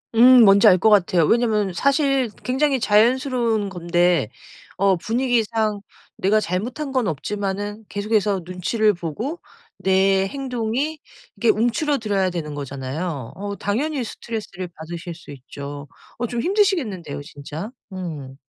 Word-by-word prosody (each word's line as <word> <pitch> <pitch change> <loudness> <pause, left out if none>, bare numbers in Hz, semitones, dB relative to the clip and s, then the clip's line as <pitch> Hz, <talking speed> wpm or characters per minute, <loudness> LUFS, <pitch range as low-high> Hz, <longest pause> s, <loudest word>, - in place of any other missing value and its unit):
음. 245 +1 +8
뭔지 200 -1 +7
알 185 - +7
것 220 - +4
같아요. 180 -5 +4
왜냐면 215 -2 +2
사실 275 - +2
굉장히 265 +1 +1
자연스러운 230 -1 +2
건데 175 - +1 0.5
어 195 0 +3
분위기상 225 -1 0 0.4
내가 205 +3 +3
잘못한 235 - -3
건 255 -5 +1
없지만은 205 +6 -3
계속해서 205 -1 0
눈치를 205 +4 +1
보고 205 - -5 0.4
내 190 0 +2
행동이 265 +4 -3 0.4
이게 235 - +2
움츠러들어야 225 - +1
되는 150 -4 -5
거잖아요. 140 0 -5
어 200 +1 -5
당연히 265 +7 -1
스트레스를 215 -5 -6
받으실 170 +2 -7
수 170 +1 -16
있죠. 140 +1 -8 0.3
어 240 - -2
좀 235 0 -3
힘드시겠는데요, 290 - 0
진짜. 150 +5 -8 0.2
음. 150 -8 -7
205 Hz, 300 characters per minute, -22 LUFS, 175-240 Hz, 0.5 s, 음